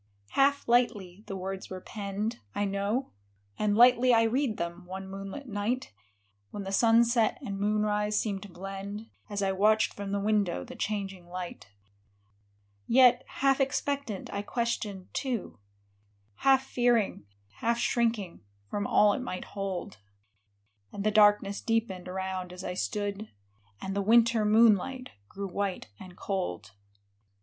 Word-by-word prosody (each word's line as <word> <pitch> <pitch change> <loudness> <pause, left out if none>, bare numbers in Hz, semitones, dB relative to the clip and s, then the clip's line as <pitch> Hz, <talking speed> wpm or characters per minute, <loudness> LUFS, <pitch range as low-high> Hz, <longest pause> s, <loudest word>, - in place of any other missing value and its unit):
Half 280 +1 +2
lightly 210 -6 +1
the 195 - -5
words 190 +1 -5
were 185 - -6
penned, 205 +3 -4 0.2
I 205 - +1
know, 200 +6 -1 0.5
And 210 -1 +1
lightly 250 +1 +6
I 225 - +5
read 235 0 0
them, 170 +1 -5
one 190 +1 -6
moonlit 195 +8 -7
night, 215 - -2 0.6
When 205 - -6
the 195 - -5
sunset 230 +2 +4
and 200 -1 -4
moonrise 210 0 +1
seemed 200 -3 -2
to 205 - -10
blend. 195 +4 -7 0.2
As 205 -1 -2
I 195 - +2
watched 215 +3 +3
from 200 -1 -6
the 200 - 0
window 200 - +1
the - - -10
changing 195 -4 -4
light. 180 - -7 1.2
Yet, 250 0 +6
half 275 0 +1
expectant, 270 -5 -2
I 200 - -1
questioned, 210 -4 -3
too, 245 - -3 0.8
Half 265 -1 +4
fearing, 240 - +1 0.3
half 235 +1 +1
shrinking, 230 -7 0 0.3
from 205 -1 -1
all 210 -1 +5
it - - -2
might 185 -7 -5
hold; 190 - -5 0.9
And 200 - -5
the 215 - +2
darkness 205 -1 +4
deepened 225 -6 -1
around 185 -1 -4
as 180 +1 -8
I 180 - -3
stood; 205 +2 -3 0.5
And 195 0 -4
the 200 - +1
winter 230 +1 +4
moonlight 230 +4 +3 0.2
grew 200 0 -5
white 195 - -3
and 180 -1 -12
cold. 105 - -3
205 Hz, 140 wpm, -29 LUFS, 195-230 Hz, 1.2 s, lightly